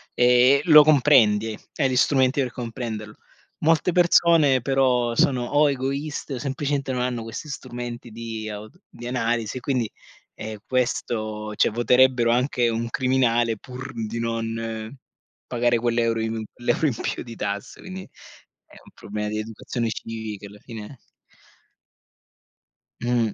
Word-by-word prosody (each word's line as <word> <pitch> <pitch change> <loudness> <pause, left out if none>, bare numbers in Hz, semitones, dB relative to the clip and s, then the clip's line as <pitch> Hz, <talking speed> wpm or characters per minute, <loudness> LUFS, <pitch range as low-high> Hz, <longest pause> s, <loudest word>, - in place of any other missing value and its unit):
ehm, 125 +3 +5
lo 155 -3 +9
comprendi, 120 -8 +4 0.2
hai 135 -4 +1
gli 130 - -1
strumenti 130 +1 +3
per 125 -2 -2
comprenderlo. 115 -3 -5 0.5
Molte 165 +3 +2
persone 170 -6 +4
però 125 -2 +2
sono 125 0 +2
o 145 +3 +3
egoiste 140 +2 -3
o - - -3
semplicemente 140 +1 -2
non 125 - -1
hanno 125 -1 -1
questi 115 +6 -7
strumenti 120 -3 -7
di 110 -1 -6
auto 105 +1 -9
di 120 - -11
analisi, 120 -1 -1
quindi, 125 -2 -1 0.5
ehm, 110 0 -7
questo 110 -4 -2
cioè - - +3
voterebbero 120 +1 +4
anche 125 -1 +2
un 115 +1 -2
criminale 120 -3 +1
pur 130 +4 -9
di 115 0 -4
non 115 +1 -4 0.5
pagare 120 0 +1
quell'euro 115 -1 +1
in 110 0 -2
l'euro 120 +6 +1
in 130 - -1
più - - -3
di 115 -1 -9
tasse, 100 -1 -5
quindi 185 0 -7 0.6
è - - -20
un - - -18
problema 105 +1 -5
di 110 - -3
educazione 115 +2 -4
civica 110 -3 -6
alla 100 +1 -14
fine. 115 +3 -10 2.0
Mh. 120 -3 0
120 Hz, 135 wpm, -24 LUFS, 115-130 Hz, 2.0 s, lo